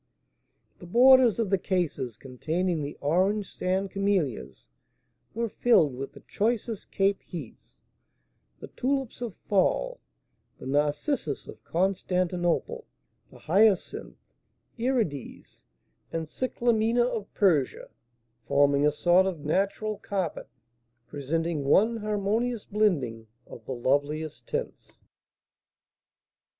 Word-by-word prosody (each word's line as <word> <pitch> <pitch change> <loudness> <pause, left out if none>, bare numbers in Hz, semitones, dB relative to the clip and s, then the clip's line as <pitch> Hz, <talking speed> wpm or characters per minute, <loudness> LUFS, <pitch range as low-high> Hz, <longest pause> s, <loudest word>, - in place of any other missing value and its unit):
The 175 - -11
borders 250 +2 +6
of 225 -4 -1
the 195 - +3
cases 145 - -2
containing 160 +7 -2
the 145 0 -5
orange 190 +7 +1
sand 190 +1 -1
camellias 160 - -1 0.7
were 230 +1 0
filled 195 - +3
with 135 +2 -6
the - - -13
choicest 225 0 -2
cape 195 0 +1
heaths, 155 -10 -10 0.8
the - - -9
tulips 265 -2 -2
of 235 -6 -4
Thol, - - +1 0.6
the - - -11
narcissus 145 - -1
of - - -12
Constantinople, 180 - -1 0.4
the - - -15
hyacinth, 210 -2 +1 0.6
irides, 225 - -2 0.5
and 165 -1 -2
cyclamina 235 +2 +1
of 220 -4 -4
Persia; 160 -10 +1 0.6
forming 140 +1 +4
a - - +3
sort 175 +5 +3
of 165 -6 -5
natural 200 +5 -1
carpet, 190 -7 -3 0.6
presenting 155 +3 -2
one 215 +11 +3
harmonious 215 +2 -1
blending 140 - 0 0.2
of 115 - -12
the 130 - -3
loveliest 145 +5 -1
tints. - - -5
185 Hz, 105 wpm, -27 LUFS, 150-215 Hz, 0.8 s, borders